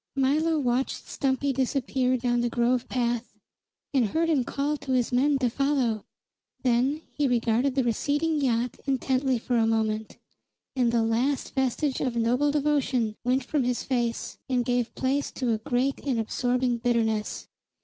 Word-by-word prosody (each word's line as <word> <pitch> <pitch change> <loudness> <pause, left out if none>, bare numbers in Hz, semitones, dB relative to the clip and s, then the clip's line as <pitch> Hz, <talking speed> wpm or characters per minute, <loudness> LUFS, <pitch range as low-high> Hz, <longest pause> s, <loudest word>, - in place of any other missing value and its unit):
Milo 305 +4 +2
watched 255 -2 -1
Stumpy 270 0 0
disappear 255 0 0
down 240 0 0
the 240 - 0
grove 240 +1 +1
path, 240 -1 -1 0.6
and 260 -4 +3
heard 330 +9 0
him 280 -5 +2
call 285 +4 -1
to 265 -2 -3
his 250 -1 +1
men 275 +3 +3
to 260 -2 +1
follow. 255 -4 0 0.6
Then 260 +5 +1
he 290 -1 +1
regarded 245 +2 +1
the 265 - +2
receding 290 +6 0
yacht 245 -2 0
intently 265 -1 +1
for 240 +1 -1
a 225 -1 +3
moment, 220 -1 -1 0.6
and 245 -3 +2
the 235 -1 +2
last 245 +5 0
vestige 265 +1 0
of 255 -3 -1
noble 245 +5 +2
devotion 280 -6 +1
went 255 +2 +1
from 280 +1 0
his 245 0 -1
face 240 -3 -2
and 250 -2 +1
gave 245 -1 -1
place 275 +2 0
to 250 -3 -1
a 220 - -1
great 250 +4 -1
and 260 -5 0
absorbing 245 +2 0
bitterness. 225 -3 0
250 Hz, 160 wpm, -26 LUFS, 235-275 Hz, 0.6 s, and